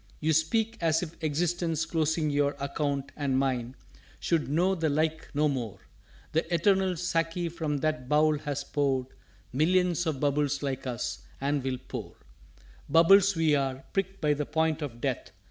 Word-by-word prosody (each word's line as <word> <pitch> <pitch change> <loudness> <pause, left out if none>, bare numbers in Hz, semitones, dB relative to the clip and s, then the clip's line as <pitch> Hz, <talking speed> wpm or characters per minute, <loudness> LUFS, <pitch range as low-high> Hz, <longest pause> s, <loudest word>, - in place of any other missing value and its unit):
"_You 160 +1 +1
speak 220 +9 +1
as 160 0 +2
if 170 -1 -7
Existence 165 +1 0
closing 160 -1 0
your 145 0 +1
Account, 140 0 -2
and 140 -3 0
mine, 130 -2 -1 0.4
should 165 -5 0
know 175 +6 +2
the 165 -4 0
like 160 +2 0
no 150 +1 +3
more; 120 -8 -3 0.5
The 160 +3 -1
Eternal 190 +1 +3
Sáki 165 0 -1
from 160 -3 -2
that 155 -5 -1
Bowl 150 0 +3
has 145 -1 -3
poured 135 -3 0 0.4
Millions 175 +4 +2
of 150 -4 -1
bubbles 145 0 0
like 135 -1 -3
us, 120 -2 -3 0.2
and 140 0 0
will 130 -1 -1
pour._" 105 -9 -6 0.7
"Bubbles 185 +5 +6
we 160 -2 +3
are, 135 -2 0
pricked 195 0 -1
by 150 -2 +3
the 145 0 -3
point 160 0 0
of 120 -5 -6
Death. - - -2
150 Hz, 160 wpm, -28 LUFS, 140-165 Hz, 0.7 s, Bubbles